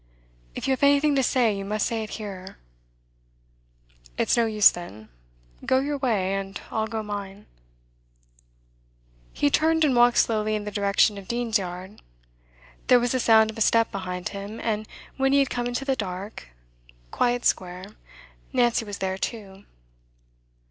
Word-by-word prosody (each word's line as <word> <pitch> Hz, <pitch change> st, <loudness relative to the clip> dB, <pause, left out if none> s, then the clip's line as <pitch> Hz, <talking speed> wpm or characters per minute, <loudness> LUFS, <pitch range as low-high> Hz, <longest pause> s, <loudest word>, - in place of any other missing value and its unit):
'If -, -, -4 dB
you -, -, +2 dB
have 265 Hz, -, -1 dB
anything 285 Hz, +1 st, +4 dB
to 270 Hz, -, +3 dB
say, 245 Hz, -5 st, +2 dB
you 195 Hz, -, -5 dB
must 210 Hz, +1 st, -1 dB
say 230 Hz, -1 st, -2 dB
it 215 Hz, -, -6 dB
here.' 195 Hz, -3 st, -8 dB, 1.6 s
'It's -, -, +2 dB
no 235 Hz, -1 st, +2 dB
use, 215 Hz, -2 st, +6 dB
then. 110 Hz, -, -10 dB, 0.5 s
Go 260 Hz, -, +2 dB
your 285 Hz, +2 st, -1 dB
way, 205 Hz, -8 st, 0 dB
and 195 Hz, -1 st, -4 dB
I'll 220 Hz, -1 st, -1 dB
go 220 Hz, 0 st, -4 dB
mine.' 205 Hz, -1 st, -7 dB, 1.9 s
He 145 Hz, -, 0 dB
turned, 320 Hz, 0 st, +3 dB
and 270 Hz, -4 st, +2 dB
walked 240 Hz, 0 st, +5 dB
slowly 215 Hz, -1 st, +2 dB
in 210 Hz, -, -3 dB
the 210 Hz, -, -5 dB
direction 200 Hz, 0 st, +2 dB
of 190 Hz, -, -13 dB
Dean's 235 Hz, -2 st, 0 dB
Yard. 185 Hz, +2 st, -8 dB, 0.9 s
There 250 Hz, -, +6 dB
was 240 Hz, 0 st, 0 dB
the 255 Hz, -, 0 dB
sound 220 Hz, -2 st, +5 dB
of 220 Hz, -, -10 dB
a -, -, -4 dB
step 230 Hz, +1 st, +3 dB
behind 180 Hz, -2 st, -4 dB
him, 200 Hz, +2 st, -7 dB
and 215 Hz, -1 st, -2 dB, 0.3 s
when 270 Hz, 0 st, +2 dB
he -, -, +5 dB
had 275 Hz, -1 st, +2 dB
come 245 Hz, 0 st, -2 dB
into 245 Hz, +3 st, -3 dB
the 270 Hz, -1 st, +1 dB
dark, 195 Hz, -, -6 dB, 0.6 s
quiet 245 Hz, 0 st, 0 dB
square, 180 Hz, 0 st, -1 dB, 0.7 s
Nancy 240 Hz, -3 st, +2 dB
was 205 Hz, -2 st, -7 dB
there 190 Hz, 0 st, -3 dB
too. 200 Hz, -4 st, -6 dB
215 Hz, 160 wpm, -25 LUFS, 195-245 Hz, 1.9 s, use